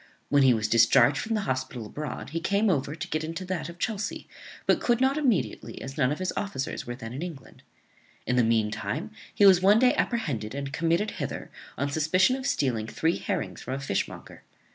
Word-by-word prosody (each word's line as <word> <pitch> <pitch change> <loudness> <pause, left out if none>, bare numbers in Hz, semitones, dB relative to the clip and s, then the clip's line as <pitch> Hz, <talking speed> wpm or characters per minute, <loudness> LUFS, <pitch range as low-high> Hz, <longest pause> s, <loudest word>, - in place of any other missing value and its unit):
When 145 0 +4
he 135 -1 +6
was 110 -1 -1
discharged 120 +5 +5
from 225 0 -2
the 215 - 0
hospital 130 - -3
abroad 150 +5 -6
he 165 - -2
came 200 +4 +2
over 145 -2 -1
to 155 - -5
get 155 0 -1
into 165 +4 -5
that 180 -3 -3
of 170 - -10
Chelsea, 215 +1 -3 0.4
but - - +3
could 240 -1 +2
not 265 +1 +3
immediately, 265 - -1
as 135 0 -7
none 130 -2 +2
of 150 - -2
his 185 0 -2
officers 135 -13 -3
were 120 - -4
then 115 -2 -8
in 135 - -5
England. 165 -7 -8 0.6
In 125 - 0
the 125 - +4
mean 110 -2 +2
time, - - -4 0.2
he 205 - +5
was 185 -2 +7
one 200 +3 +6
day 250 +2 +5
apprehended 135 - -2
and 140 0 -4
committed 170 +6 +1
hither - - -5 0.3
on 140 +2 -1
suspicion 170 - +3
of 265 0 -4
stealing 120 - 0
three 165 +8 0
herrings 185 -5 -3
from 130 - -4
a - - -4
fishmonger. 135 -8 -4
155 Hz, 210 wpm, -27 LUFS, 130-195 Hz, 0.6 s, was